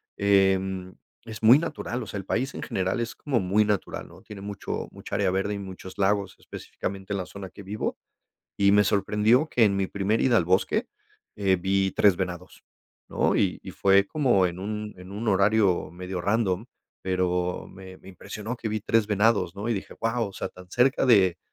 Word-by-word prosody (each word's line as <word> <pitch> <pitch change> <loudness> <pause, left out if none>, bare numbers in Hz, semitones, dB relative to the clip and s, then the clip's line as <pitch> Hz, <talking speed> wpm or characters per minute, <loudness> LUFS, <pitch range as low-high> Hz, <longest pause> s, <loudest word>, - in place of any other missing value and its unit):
em, 95 -2 +1 0.3
es 110 -1 -8
muy 115 +5 +8
natural, 140 -6 -4
o - - -10
sea, - - -5
el 95 - -6
país 130 +7 -1
en - - -6
general 95 +4 -1
es 120 -1 -3
como 135 -5 -1
muy 100 +3 +2
natural, 105 -2 -2
¿no? - - -15
Tiene 100 -2 -10
mucho 100 0 -5
mucha - - -7
área - - +1
verde 95 +2 -1
y 100 - -3
muchos 95 -1 -9
lagos, 100 -1 +1
específicamente 95 +1 -6
en - - -1
la 95 - -3
zona 95 -1 -9
que 100 - -12
vivo. 105 +3 -3 0.6
Y 100 0 +4
me 105 0 +5
sorprendió 105 - +2
que 120 - +3
en 100 -2 +3
mi 95 -1 -1
primera 100 +3 0
ida 120 -3 +4
al 85 - +3
bosque, 95 +2 +1 0.5
eh, 95 -2 +2
vi 95 +1 +1
3 100 +1 +4
venados, 90 -1 -6 0.5
¿no? - - +1
Y - - +1
y - - -7
fue 100 0 +4
como 120 -9 +2
en 90 +1 -5
un 105 +1 -5
en 90 +1 -12
un 105 +4 -5
horario 100 -2 +2
medio 90 +1 -5
random, 100 0 0 0.4
pero 90 -1 -1
me 95 -1 -12
me - - -15
impresionó 105 +5 -7
que 115 - -4
vi 110 0 -1
3 110 +1 +1
venados, 105 -3 +2
¿no? 105 +3 -4
Y 115 - +1
dije: 95 - -6
"Guau", 115 0 -1
o 100 - -12
sea, - - -4
tan 90 0 -15
cerca 130 +2 +3
de 95 -8 +5
100 Hz, 200 wpm, -26 LUFS, 95-110 Hz, 0.6 s, muy